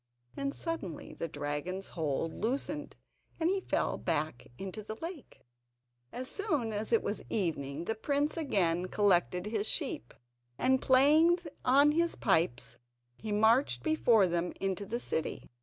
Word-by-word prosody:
And 275 0 -3
suddenly 330 - -4
the 165 - -4
dragon's 150 +6 -4
hold 160 0 -2
loosened, 280 +5 -3 0.4
and 330 +2 +2
he 390 0 0
fell - - -1
back 150 -4 -2
into 195 +2 -6
the 215 +1 -6
lake. 330 +3 -9 0.7
As 255 +1 -5
soon 300 - -1
as 210 +2 -3
it 230 - +3
was 205 - -2
evening 160 -6 -2
the 225 - 0
prince 285 +6 0
again 185 - +1
collected 180 -2 +2
his 215 0 0
sheep, 115 - -2 0.4
and 260 0 +2
playing 300 +6 +5 0.3
on 280 +3 +5
his 335 +2 +1
pipes 160 - +1 0.4
he 215 - -6
marched 220 +6 +3
before 240 -10 +4
them 175 0 -1
into 195 +1 -2
the 235 +4 -2
city. 160 -9 -2
215 Hz, 140 wpm, -31 LUFS, 175-280 Hz, 0.7 s, playing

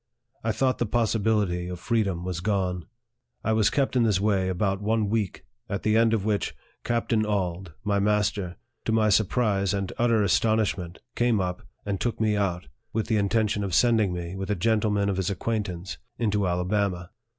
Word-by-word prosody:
I 115 - +1
thought 130 +4 +1
the 120 - 0
possibility 105 -5 +1
of 90 -1 -6
freedom 100 -6 0
was 90 -2 -3
gone. 90 -2 -1 0.6
I 110 - +1
was 110 -2 +4
kept 135 -2 0
in 125 - +4
this 105 -5 +3
way 100 -2 +1
about 95 +2 0
one 110 0 +1
week, 110 -5 -2 0.2
at 100 - -3
the 110 0 +2
end 115 0 +4
of 105 -3 -2
which, 105 -2 -1 0.3
Captain 115 -2 +1
Auld, 95 -4 -2
my 100 -1 +1
master, 105 -3 0 0.3
to - - 0
my 110 -1 +3
surprise 100 -2 +2
and 100 -1 -3
utter 115 -3 +3
as 85 -5 +3
tonishment, 105 -6 0 0.2
came 120 -3 +2
up, 90 -1 -2 0.2
and 100 -2 -2
took 120 - -1
me 110 -1 +2
out, 90 -5 -1 0.3
with 110 +1 -1
the 110 - +3
inten 105 +2 +2
tion 105 -1 -1
of 95 -3 -1
sending 110 -5 +4
me, 90 0 -5
with 95 +1 -5
a 105 - +1
gentleman 105 0 +1
of 100 -2 0
his 95 -2 0
acquaint 105 +2 -2
ance, 90 +1 -7 0.2
into 105 -4 +1
Alabama. 90 0 -1
105 Hz, 190 wpm, -26 LUFS, 95-110 Hz, 0.6 s, was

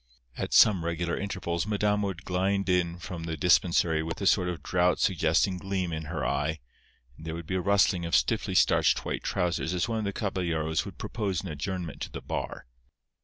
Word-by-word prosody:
At - - -4
somewhat 90 -6 +5
regular 85 0 -1
intervals 95 -2 -3
Madama 105 -1 +1
would 90 -3 -6
glide 95 +2 0
in 90 -2 +1
from 90 -1 -7
the 80 -1 -4
dispensary 85 -1 +3
with 80 +1 -5
a 100 - -3
sort 90 -2 +3
of 85 -5 -5
drought 90 0 +2
suggesting 90 +2 +2
gleam 95 -3 -2
in 80 0 -4
her - - -3
eye, 75 +2 0 0.6
and 80 - -11
there 80 - -3
would 85 0 -7
be 95 - -4
a 95 - 0
rustling 100 -2 +3
of 85 - 0
stiffly - - +1
starched - - +3
white - - -2
trousers 90 0 -1
as 85 -1 0
one 115 -1 -1
of 110 - -2
the 100 - -1
caballeros 85 -7 -1
would - - -9
propose 100 -7 -2
an 95 - -5
adjournment 80 -1 -5
to - - -4
the - - -6
bar. - - -5
90 Hz, 200 wpm, -28 LUFS, 80-95 Hz, 0.6 s, somewhat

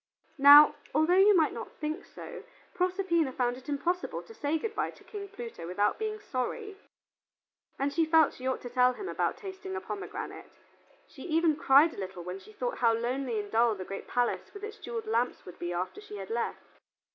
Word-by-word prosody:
Now, 285 +2 +10 0.2
although 315 +3 +4
you 400 0 +7
might 315 -3 +3
not 230 - -7
think 305 0 -4
so, 480 -4 -10 0.3
Proserpina 360 -5 +1
found 245 -1 0
it 260 +2 -12
impossible 345 +5 -2
to 450 - -13
say 310 -6 -1
good 445 +6 -4
by - - -1
to - - -15
King 405 -2 -7
Pluto 235 - -8
without 205 - 0
being 430 -1 -3
sorry, 415 - -4 1.0
and 280 +1 -1
she 330 - +3
felt 320 -1 +5
she 255 - -6
ought 260 - -1
to 245 - -7
tell 250 0 +4
him 390 - -7
about - - -1
tasting 380 -1 -7
the 385 - -2
pomegranate. 400 -1 -7 0.6
She - - -14
even 325 -1 +3
cried 305 0 +5
a - - -13
little 190 -2 -6
when 180 +2 -6
she 195 +3 -15
thought 245 +3 -4
how 230 -2 +4
lonely 240 0 -2
and 205 -1 -6
dull 230 0 +3
the 185 -2 -7
great 195 +1 -7
palace 245 -1 -1
with 405 - -9
its 430 +1 -6
jeweled 235 - -5
lamps 230 +3 -1
would 180 - -11
be 175 0 -3
after 180 - -3
she 210 - -9
had 195 0 -7
left. 235 +1 -4
280 Hz, 205 wpm, -30 LUFS, 230-365 Hz, 1.0 s, Now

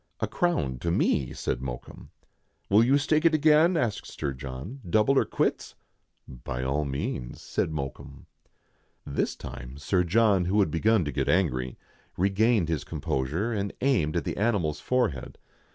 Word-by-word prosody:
"A - - +1
crown 70 - 0
to 85 - -2
me," 70 -5 +1
said 60 - -3
Mokoum, 60 -2 -7 0.6
"Will 105 +3 +6
you 135 +4 +4
stake 155 +2 +1
it 165 -2 +5
again?" 155 +3 +4
asked 115 -7 -1
Sir 70 -2 -4
John, 65 - -8
"double 110 +8 +3
or - - +1
quits." - - -1 0.3
" - - -48 0.2
By 60 -1 -3
all 70 +3 0
means," 65 -3 -4
said - - -2
Mokoum. 70 -2 -6 0.8
This 70 - -1
time 65 +1 -9
Sir 90 +5 +1
John, 100 0 +3
who 100 +4 +1
had 95 -7 +2
begun 105 +3 +2
to 75 - -2
get - - -1
angry, 65 -9 +1 0.4
re 95 +3 +2
gained 110 -2 +3
his 80 -4 -1
composure, 80 - -2
and 100 -2 -2
aimed 115 - +2
at - - -1
the - - -3
animal's 100 -9 0
forehead. 120 - -1
90 Hz, 165 wpm, -27 LUFS, 70-115 Hz, 0.8 s, Will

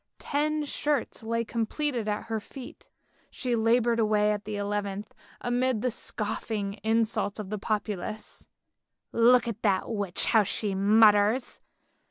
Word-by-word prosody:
Ten 300 +1 -1
shirts 290 -1 -2
lay 230 +1 -1
completed 235 +1 -2
at 210 0 -2
her 225 -1 -3
feet— 250 +4 -11 0.4
she 250 -2 -2
laboured 230 +1 +2
away 210 -1 +3
at 210 -1 -3
the 210 0 -4
eleventh, 205 0 -3 0.3
amid 245 -2 0
the 250 - +1
scoffing 210 -2 -3
insults 220 -2 +1
of 210 -2 -6
the 210 - -3
populace. 210 0 -4 0.3
" - - -59 0.2
Look 235 +1 +5
at 225 -1 -4
the 195 -3 +2
witch 205 -5 -1
how 220 - +5
she 205 0 -2
mutters. 210 +4 +4
220 Hz, 140 wpm, -28 LUFS, 205-235 Hz, 0.4 s, Look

